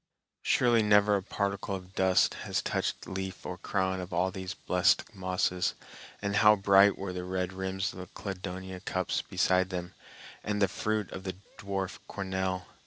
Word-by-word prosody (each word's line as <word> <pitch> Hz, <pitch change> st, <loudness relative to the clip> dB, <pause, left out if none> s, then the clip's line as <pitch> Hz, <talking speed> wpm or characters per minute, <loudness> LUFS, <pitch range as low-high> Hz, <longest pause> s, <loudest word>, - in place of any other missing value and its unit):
Surely 120 Hz, -2 st, +4 dB
never 105 Hz, -1 st, +5 dB
a 100 Hz, -, 0 dB
particle 100 Hz, 0 st, -2 dB
of 90 Hz, 0 st, -9 dB
dust 95 Hz, -1 st, +3 dB
has -, -, -2 dB
touched -, -, -1 dB
leaf 95 Hz, 0 st, -5 dB
or 90 Hz, -, -4 dB
crown 95 Hz, 0 st, -1 dB
of 90 Hz, +1 st, -7 dB
all 90 Hz, +2 st, +1 dB
these 95 Hz, 0 st, -5 dB
blessed 90 Hz, +4 st, +2 dB
mosses; 90 Hz, -1 st, 0 dB, 0.5 s
and 100 Hz, 0 st, 0 dB
how 105 Hz, 0 st, +7 dB
bright 100 Hz, 0 st, +5 dB
were 95 Hz, -1 st, -4 dB
the 90 Hz, 0 st, -4 dB
red 90 Hz, 0 st, -2 dB
rims 95 Hz, +1 st, -2 dB
of -, -, -10 dB
the 90 Hz, -, -7 dB
cladonia 95 Hz, -1 st, -6 dB
cups 95 Hz, -1 st, -1 dB
beside 95 Hz, 0 st, +2 dB
them, 90 Hz, -2 st, -4 dB, 0.5 s
and 105 Hz, 0 st, -1 dB
the 100 Hz, -, +4 dB
fruit 110 Hz, +1 st, -2 dB
of 95 Hz, -, -7 dB
the 95 Hz, -1 st, -4 dB, 0.2 s
dwarf 100 Hz, -3 st, -3 dB
cornel! 95 Hz, -1 st, -2 dB
95 Hz, 170 wpm, -30 LUFS, 90-100 Hz, 0.5 s, how